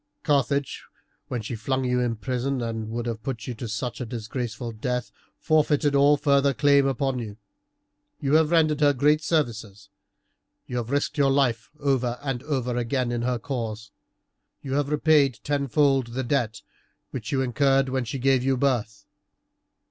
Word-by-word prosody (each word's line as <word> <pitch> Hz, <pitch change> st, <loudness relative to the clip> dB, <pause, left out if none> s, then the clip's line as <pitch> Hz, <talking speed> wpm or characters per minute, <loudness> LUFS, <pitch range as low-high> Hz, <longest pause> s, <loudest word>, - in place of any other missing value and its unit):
Carthage, 140 Hz, -1 st, 0 dB, 0.4 s
when 120 Hz, -3 st, -4 dB
she 115 Hz, -, -4 dB
flung 130 Hz, +5 st, -1 dB
you 125 Hz, 0 st, +1 dB
in 120 Hz, -2 st, 0 dB
prison 125 Hz, +5 st, -2 dB
and 115 Hz, -2 st, -4 dB
would 120 Hz, +1 st, -3 dB
have 115 Hz, -2 st, -4 dB
put 115 Hz, -2 st, -5 dB
you 125 Hz, -, -4 dB
to 115 Hz, 0 st, -7 dB, 0.3 s
a 125 Hz, -, -3 dB
disgraceful 120 Hz, 0 st, -5 dB
death, 125 Hz, +3 st, -3 dB, 0.3 s
forfeited 150 Hz, -2 st, +2 dB
all 140 Hz, +1 st, +5 dB
further 140 Hz, -1 st, +2 dB
claim 140 Hz, 0 st, +4 dB
upon 135 Hz, -1 st, -1 dB
you. 105 Hz, -3 st, -7 dB, 0.8 s
You 140 Hz, -2 st, -1 dB
have 155 Hz, -1 st, +5 dB
rendered 155 Hz, -3 st, +3 dB
her 145 Hz, -1 st, +5 dB
great 150 Hz, +4 st, +3 dB
services, 115 Hz, -, -2 dB, 0.8 s
you 125 Hz, -, -4 dB
have 120 Hz, -1 st, -3 dB
risked 145 Hz, +2 st, -1 dB
your 140 Hz, -1 st, +4 dB
life 130 Hz, -5 st, +1 dB
over 130 Hz, -4 st, 0 dB
and 135 Hz, -4 st, -2 dB
over 130 Hz, -4 st, -2 dB
again 120 Hz, +1 st, -1 dB
in 120 Hz, -1 st, -2 dB
her 125 Hz, 0 st, 0 dB
cause, 115 Hz, -3 st, -5 dB, 0.7 s
you 135 Hz, -, -4 dB
have 145 Hz, 0 st, 0 dB
repaid 150 Hz, -4 st, +3 dB
tenfold 140 Hz, -2 st, +1 dB
the 125 Hz, +3 st, -4 dB
debt 120 Hz, -4 st, -1 dB, 0.5 s
which 110 Hz, -4 st, -5 dB
you 130 Hz, -1 st, +1 dB
incurred 135 Hz, +1 st, +2 dB
when 130 Hz, -1 st, -1 dB
she 120 Hz, +3 st, -4 dB
gave 130 Hz, -1 st, +2 dB
you 135 Hz, 0 st, +1 dB
birth. 120 Hz, -6 st, -1 dB
130 Hz, 165 wpm, -25 LUFS, 120-140 Hz, 0.8 s, all